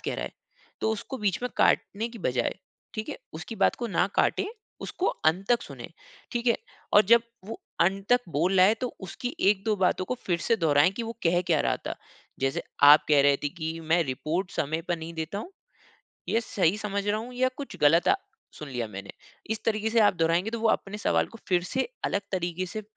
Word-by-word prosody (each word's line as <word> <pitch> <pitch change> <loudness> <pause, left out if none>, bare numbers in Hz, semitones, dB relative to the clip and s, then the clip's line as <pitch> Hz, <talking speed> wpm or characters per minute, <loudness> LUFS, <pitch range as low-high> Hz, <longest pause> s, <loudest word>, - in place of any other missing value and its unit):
कह - - -3
रहा - - -3
है, - - -7 0.5
तो 220 - +1
उसको 255 +4 -5
बीच 200 -4 0
में 250 - 0
काटने 220 +4 +2
की 230 -1 -11
बजाए, 125 -2 0 0.4
ठीक 215 0 -4
है? - - -4 0.2
उसकी 160 +8 -7
बात - - +3
को 240 - -3
ना 190 -2 +1
काटे - - +2 0.3
उसको 375 - -3 0.2
अंत 180 +5 +2
तक 240 -1 +3
सुने, - - -9 0.4
ठीक 240 0 -2
है? 235 - +4 0.4
और 210 - +8
जब 230 +3 +6 0.2
वो 225 - -7 0.2
अंत 195 +3 +2
तक 245 - +5
बोल 170 +7 +1
रहा 185 - +7
है 215 - +4
तो 250 - -1
उसकी 210 +6 -5 0.2
1-2 210 +1 0
बातों 185 -1 +1
को 250 - -2
फिर 175 -2 +1
से 230 +6 +1
दोहराएँ 155 -1 +4
कि 235 - -2
वो 230 0 -4
कह 175 +1 +3
क्या 155 -4 +3
रहा - - +1
था, - - -2 0.5
जैसे 135 0 0 0.2
आप 145 +1 +9
कह 145 -2 +6
रहे 140 0 +5
थे - - +2
कि 160 +1 -5
मैं 170 +1 +5
रिपोर्ट 155 +7 -2
समय 160 +3 -1
पर 175 - +1
नहीं 165 +1 -7
देता 160 +4 -4
हूँ, 285 - -7 0.8
ये 230 - +2
सही 195 -5 +1
समझ 200 -1 -3
रहा 210 +1 +1
हूँ 245 +2 -8
या 255 +1 +2
कुछ 285 - -7
गलत 165 +4 +5 0.5
सुन 150 - -7
लिया 120 -3 -3
मैंने? 100 -1 -8 0.4
इस 220 - -1
तरीक़े 220 0 0
से 230 0 +3
आप 205 -2 +5
दोहराएँगे 170 +4 +1
तो 230 - -3
वो 225 - +2
अपने 210 0 -1
सवाल - - +1
को 230 - -13
फिर 180 -2 +3
से 260 - -1 0.2
अलग 200 - +1
तरीक़े 180 0 -2
से 215 +4 -6
190 Hz, 220 wpm, -27 LUFS, 160-220 Hz, 0.8 s, आप